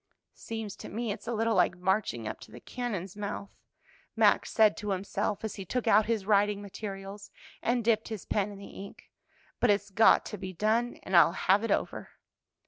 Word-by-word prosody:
"Seems 220 Hz, -3 st, -6 dB
to -, -, -9 dB
me 230 Hz, +1 st, -3 dB
it's 205 Hz, -, -7 dB
a -, -, -1 dB
little 225 Hz, 0 st, +1 dB
like -, -, +2 dB
marching 180 Hz, -, -1 dB
up -, -, -5 dB
to -, -, -13 dB
the -, -, -10 dB
cannon's 205 Hz, -7 st, -5 dB
mouth," 200 Hz, -1 st, -5 dB, 0.6 s
Max -, -, +3 dB
said 215 Hz, -2 st, +5 dB
to 210 Hz, -, -5 dB
himself, 200 Hz, +2 st, -2 dB
as 220 Hz, -, -4 dB
he 195 Hz, -, -5 dB
took 245 Hz, +6 st, -2 dB
out 215 Hz, -1 st, +4 dB
his 225 Hz, -4 st, -1 dB
writing 205 Hz, 0 st, +3 dB
materials 200 Hz, 0 st, -7 dB, 0.3 s
and 240 Hz, 0 st, 0 dB
dipped 225 Hz, -1 st, +2 dB
his 220 Hz, -4 st, -6 dB
pen 205 Hz, -1 st, 0 dB
in 200 Hz, -, -10 dB
the 200 Hz, -, -10 dB
ink, 200 Hz, +1 st, -11 dB, 0.5 s
"but 245 Hz, -, +3 dB
it's 205 Hz, 0 st, +1 dB
got 220 Hz, +3 st, +5 dB
to 210 Hz, -, -6 dB
be 185 Hz, -1 st, -6 dB
done, 220 Hz, +6 st, +1 dB
and 190 Hz, -, -2 dB
I'll 170 Hz, 0 st, +7 dB
have 195 Hz, +3 st, +2 dB
it 230 Hz, -, -2 dB
over." -, -, -1 dB
205 Hz, 200 wpm, -29 LUFS, 195-220 Hz, 0.6 s, I'll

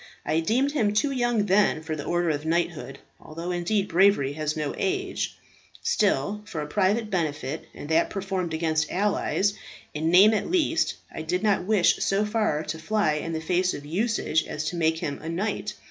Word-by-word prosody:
I 160 Hz, -, +1 dB
deemed 245 Hz, +12 st, +1 dB
him 220 Hz, -8 st, +1 dB
too 280 Hz, +6 st, +2 dB
young 240 Hz, -5 st, +1 dB
then 195 Hz, -5 st, +2 dB
for 160 Hz, -1 st, -3 dB
the 145 Hz, -, -6 dB
order 175 Hz, -1 st, +1 dB
of 145 Hz, -1 st, -3 dB
knighthood 160 Hz, -5 st, -1 dB, 0.2 s
although 165 Hz, +3 st, -6 dB
indeed 190 Hz, +3 st, 0 dB
bravery 170 Hz, -6 st, +3 dB
has 155 Hz, +1 st, -2 dB
no 150 Hz, -2 st, -2 dB
age; 380 Hz, 0 st, -2 dB, 0.5 s
still 205 Hz, -, +1 dB
for 165 Hz, -, -6 dB
a -, -, -3 dB
private 205 Hz, +7 st, 0 dB
benefit, 150 Hz, -5 st, -2 dB
and -, -, -8 dB
that 160 Hz, +1 st, +3 dB
performed 190 Hz, -4 st, -3 dB
against 160 Hz, -1 st, 0 dB
allies, 205 Hz, +1 st, +1 dB, 0.4 s
in 155 Hz, +2 st, -1 dB
name 195 Hz, +6 st, +7 dB
at 215 Hz, -, -1 dB
least, 330 Hz, -2 st, +1 dB, 0.2 s
I -, -, -5 dB
did 180 Hz, +5 st, -2 dB
not 205 Hz, -4 st, +2 dB
wish 210 Hz, -3 st, +3 dB
so 200 Hz, +2 st, +1 dB
far 210 Hz, -8 st, 0 dB
to 160 Hz, +1 st, -5 dB
fly 205 Hz, -1 st, +1 dB
in 165 Hz, -, -4 dB
the 160 Hz, -, -2 dB
face 180 Hz, +3 st, +1 dB
of 145 Hz, -, -8 dB
usage 185 Hz, -1 st, 0 dB
as 150 Hz, -, -4 dB
to -, -, -6 dB
make 160 Hz, -1 st, +1 dB
him 140 Hz, -3 st, -4 dB
a 160 Hz, -, -6 dB
knight. 200 Hz, +3 st, -2 dB
180 Hz, 190 wpm, -26 LUFS, 160-210 Hz, 0.5 s, name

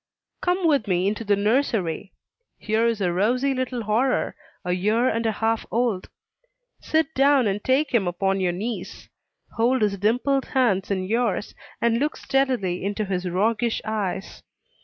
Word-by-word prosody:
Come 360 Hz, 0 st, 0 dB
with 285 Hz, -10 st, +2 dB
me 180 Hz, 0 st, +1 dB
into 215 Hz, +3 st, -2 dB
the 205 Hz, -1 st, +2 dB
nursery. 205 Hz, -, 0 dB, 0.5 s
Here 220 Hz, +2 st, +1 dB
is 230 Hz, -3 st, -1 dB
a 175 Hz, -2 st, +1 dB
rosy 250 Hz, +9 st, +1 dB
little 255 Hz, -2 st, -3 dB
horror, 230 Hz, +5 st, +1 dB, 0.3 s
a 180 Hz, -, -1 dB
year 210 Hz, +7 st, +2 dB
and 230 Hz, -2 st, 0 dB
a -, -, +2 dB
half 225 Hz, +1 st, 0 dB
old. 230 Hz, -5 st, -1 dB, 0.7 s
Sit 320 Hz, 0 st, 0 dB
down 275 Hz, -1 st, +4 dB
and 200 Hz, 0 st, -1 dB
take 270 Hz, +4 st, +2 dB
him 210 Hz, -6 st, +2 dB
upon 195 Hz, +2 st, 0 dB
your 185 Hz, -2 st, +1 dB
knees. 215 Hz, +7 st, -5 dB, 0.5 s
Hold 240 Hz, +1 st, +2 dB
his 200 Hz, -2 st, 0 dB
dimpled 250 Hz, +6 st, +1 dB
hands 210 Hz, -7 st, +1 dB
in 190 Hz, -2 st, -1 dB
yours, 225 Hz, +1 st, -1 dB, 0.3 s
and 235 Hz, 0 st, +2 dB
look 295 Hz, +3 st, -1 dB
steadily 250 Hz, -11 st, 0 dB
into 205 Hz, +2 st, -2 dB
his 185 Hz, -2 st, -2 dB
roguish 220 Hz, +5 st, +1 dB
eyes. 210 Hz, -3 st, -3 dB
220 Hz, 160 wpm, -24 LUFS, 195-255 Hz, 0.7 s, down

